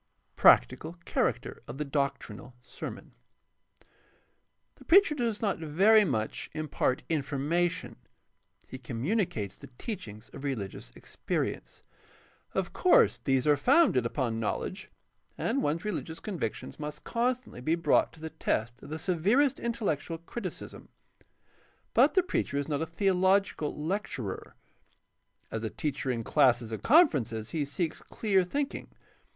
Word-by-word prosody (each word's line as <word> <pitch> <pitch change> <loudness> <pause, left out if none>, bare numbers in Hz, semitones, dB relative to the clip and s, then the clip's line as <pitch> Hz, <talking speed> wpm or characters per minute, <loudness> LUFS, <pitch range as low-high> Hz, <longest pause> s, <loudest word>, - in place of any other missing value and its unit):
Practical 155 - +5
character - - -1
of 120 - -7
the 150 - -2
doctrinal 135 -4 -3
sermon. - - -8 0.9
— - - -39
The - - -15
preacher 390 -1 +6
does 235 -6 -2
not 200 -5 0
very 195 +8 +5
much 110 - -2
impart 155 -4 -1
information; 155 +3 -1 0.7
he 130 - -8
communicates 125 - -2
the - - -12
teachings 115 - -7
of 140 - -9
religious 100 - -4
experience. - - -4 0.7
Of - - -1
course - - +4
these 135 -1 +2
are 150 -1 +5
founded 240 - +4
upon 115 -3 -2
knowledge, 115 - -3 0.5
and 275 - 0
one's 160 +6 -1
religious 170 -6 -4
convictions 165 - -5
must 150 0 -6
con 245 +2 +1
stantly 235 - -13
be 160 +5 +2
brought 165 -3 +2
to 160 - -15
the 160 0 -6
test 115 +3 -2
of - - -11
the 155 - -4
severest 200 - +2
intellectual 200 - -2
criticism. 180 +3 -7 1.0
But - - +5
the 375 - +5
preacher 245 - -1
is 140 - -1
not 150 -1 -1
a 160 - -1
theological 190 -2 +1
lecturer. 150 - -4 1.0
As 110 - -3
a 110 - -1
teacher 145 0 -3
in 115 -2 -1
classes 120 -4 +3
and 110 - -4
conferences 125 - +3
he 150 -3 -1
seeks 160 +4 -3
clear 195 -4 +1
thinking. 280 +10 -3
155 Hz, 135 wpm, -29 LUFS, 130-200 Hz, 1.0 s, preacher